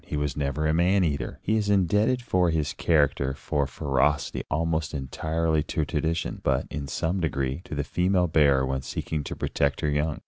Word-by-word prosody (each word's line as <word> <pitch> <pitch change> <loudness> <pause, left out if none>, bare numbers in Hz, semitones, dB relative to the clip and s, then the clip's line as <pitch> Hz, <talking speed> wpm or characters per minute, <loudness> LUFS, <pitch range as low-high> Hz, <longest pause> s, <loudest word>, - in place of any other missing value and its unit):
He 75 - -4
was 75 -2 -1
never 75 +1 -1
a 75 - +2
man 90 +4 +3
eater. 70 -5 -2
He 110 +2 +1
is 105 -2 0
indebted 105 +6 +2
for 90 -6 +2
his 80 -3 0
character 70 -4 +1
for 70 0 -1
ferocity 70 0 0
almost 80 0 -1
entirely 80 +4 -1
to 80 0 -2
tradition, 80 +3 -2
but, - - +1
in 70 -1 -4
some 85 +7 -1
degree, 70 -3 -1
to - - -6
the 70 - -1
female 90 +5 +1
bear 70 -5 +3
when 65 0 -2
seeking 75 +3 -4
to - - -5
protect 70 0 -1
her 75 - +1
young. 75 +1 0
75 Hz, 185 wpm, -26 LUFS, 70-85 Hz, -, man